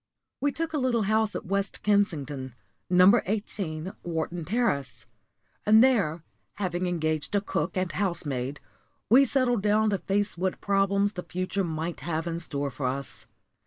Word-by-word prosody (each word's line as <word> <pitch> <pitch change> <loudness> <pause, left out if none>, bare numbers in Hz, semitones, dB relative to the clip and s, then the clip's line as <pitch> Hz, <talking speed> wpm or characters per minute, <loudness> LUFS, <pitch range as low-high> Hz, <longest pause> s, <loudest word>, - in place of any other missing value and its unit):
We 285 +1 +1
took 320 +2 -3
a 300 - +1
little 245 -4 +1
house 215 +1 +1
at - - -4
West 195 +1 -1
Kensington 150 - 0 0.3
No. 185 +6 +6
18, 190 -4 -3
Wharton 170 0 -3
Terrace 140 - -1 0.6
and 220 +2 +7
there, 195 -11 +2 0.3
having 180 -2 -2
engaged 155 0 -1
a - - +4
cook 185 -3 -2
and 185 -2 0
housemaid, 145 -7 -2 0.5
we 270 +4 +8
settled 245 -4 +1
down 210 +1 +3
to 200 - 0
face 200 -2 -1
what 185 0 -1
problems 200 +1 +1
the 180 - -5
future 185 +3 -2
might 165 0 -3
have 160 +2 -3
in 170 -1 -3
store 140 -4 -2
for 130 0 -3
us. 135 +1 -5
185 Hz, 155 wpm, -27 LUFS, 155-205 Hz, 0.6 s, we